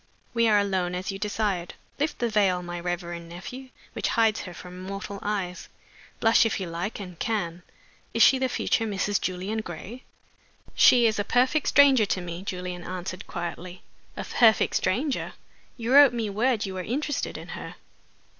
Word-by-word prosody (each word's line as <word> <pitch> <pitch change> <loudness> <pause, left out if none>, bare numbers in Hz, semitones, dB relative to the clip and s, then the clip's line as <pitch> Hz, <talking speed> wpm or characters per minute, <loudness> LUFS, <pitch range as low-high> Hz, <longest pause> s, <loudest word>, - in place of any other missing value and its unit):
We 230 -1 +3
are 210 -1 +5
alone, 190 -3 0
as 185 +2 -3
you 195 - -7
desired. 205 -4 -2 0.2
Lift 295 +2 -1
the 240 - 0
veil, 195 -5 +2
my 175 0 -5
reverend 175 -1 -4
nephew, 250 +10 -9 0.2
which - - -2
hides 225 -2 +3
her 180 - -8
from 180 +1 -10
mortal 195 +1 -6
eyes! 195 -4 -3 0.5
Blush, 225 0 +5
if 225 - 0
you 190 - -3
like 175 +6 -4
and 180 -4 -9
can. 180 -6 -2 0.5
Is - - +4
she 265 - +6
the 260 0 0
future 225 -2 0
Mrs. 205 0 0
Julian 185 +4 -2
Gray?" 215 +5 -7 0.7
"She 240 -2 +6
is 220 -2 +2
a - - +1
perfect 255 +7 +2
stranger 270 -7 +6
to 185 - 0
me," 175 0 -6
Julian 180 -2 -5
answered, 185 +1 -6
quietly. 175 +1 -6 0.3
"A - - -3
perfect 225 -2 +3
stranger! 255 +9 0 0.4
You 235 +1 -1
wrote 285 -2 +8
me 225 -3 -2
word 225 +1 +1
you 190 - -5
were 185 - -4
interested 290 - -2
in - - -10
her." - - -7
200 Hz, 175 wpm, -26 LUFS, 180-230 Hz, 0.7 s, wrote